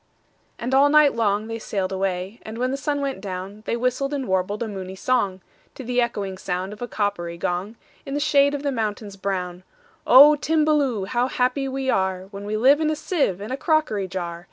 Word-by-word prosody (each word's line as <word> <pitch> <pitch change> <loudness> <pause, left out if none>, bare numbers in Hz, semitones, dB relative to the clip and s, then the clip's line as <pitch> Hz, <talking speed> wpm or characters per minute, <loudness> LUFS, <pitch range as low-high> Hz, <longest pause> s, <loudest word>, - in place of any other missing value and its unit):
And 245 +3 -3
all 275 +2 +6
night 300 -1 +5
long 210 -2 +1
they 225 0 -5
sail'd 195 -3 -3
away; 190 +2 -3
And, 220 +1 -8
when 255 +2 0
the - - -1
sun 285 +1 -2
went 275 -7 -3
down, 195 +1 -6
They 235 - 0
whistled 255 +4 -1
and 270 -3 -3
warbled 190 +4 0
a - - -3
moony 190 -2 -6
songTo 195 -4 0 0.3
the 250 -1 -1
echoing 200 -5 -3
sound 185 +2 -3
of 210 - -13
a 245 - -3
coppery 200 -7 -2
gong, 180 +6 -3 0.3
In 275 - -5
the - - 0
shade 285 -1 +3
of 285 - -5
the 285 - 0
mountains 210 -4 -3
brown,"O 220 - +3
Timballoo! 300 -9 +1
how 245 +4 0
happy 255 +2 0
we 265 0 -3
areWhen 190 0 -2
we 215 +1 -1
live 275 +7 +5
in 310 - +2
a 310 - 0
sieve 300 - -1
and 210 +5 -5
a - - -2
crockery 305 - +1
jar! 175 -2 -5
225 Hz, 200 wpm, -23 LUFS, 190-275 Hz, 0.3 s, all